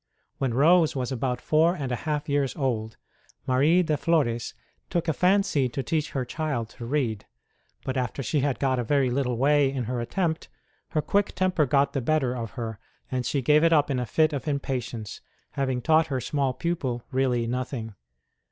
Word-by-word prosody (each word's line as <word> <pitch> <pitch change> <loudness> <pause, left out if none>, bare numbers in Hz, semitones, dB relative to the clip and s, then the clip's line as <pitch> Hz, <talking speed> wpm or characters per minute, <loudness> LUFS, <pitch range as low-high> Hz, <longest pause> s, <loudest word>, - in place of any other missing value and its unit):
When 130 -4 0
Rose 160 +4 +4
was 125 -2 -2
about 125 -1 -1
four 160 +6 +3
and 135 -7 -4
a - - +1
half 150 +3 -3
years 140 -2 0
old 115 -6 -2 0.5
Marie 150 +8 +4
de 155 -3 0
Flores 140 -9 0 0.3
took 175 0 -1
a 160 - +2
fancy 180 -8 +2
to 135 +3 -4
teach 155 +2 -1
her 130 -2 -1
child 125 -5 -3
to 115 - -9
read; 120 -7 -1 0.6
but 130 - -2
after 130 +2 -2
she 145 +6 0
had 140 -1 0
got 130 -2 +1
a - - 0
very 135 +1 +2
little 125 -2 0
way 140 +1 +3
in 135 -2 -2
her 120 +1 -2
attempt, 160 +6 -2 0.4
her 155 - 0
quick 200 0 0
temper 180 -5 +2
got 140 +2 +2
the 135 - -1
better 130 -1 +1
of 115 -3 -5
her, 110 -3 -4 0.3
and 130 -1 -1
she 140 -3 -1
gave 150 +5 +4
it 165 - +4
up 150 -2 +3
in 130 - 0
a 125 - -3
fit 155 +3 +2
of 140 -1 -4
impatience, 125 -6 -3 0.3
having 130 -3 -2
taught 160 +3 +4
her 135 -4 -1
small 135 +2 0
pupil 130 -7 -2
really 125 -2 +1
nothing. 125 -2 -3
135 Hz, 190 wpm, -26 LUFS, 125-155 Hz, 0.6 s, Rose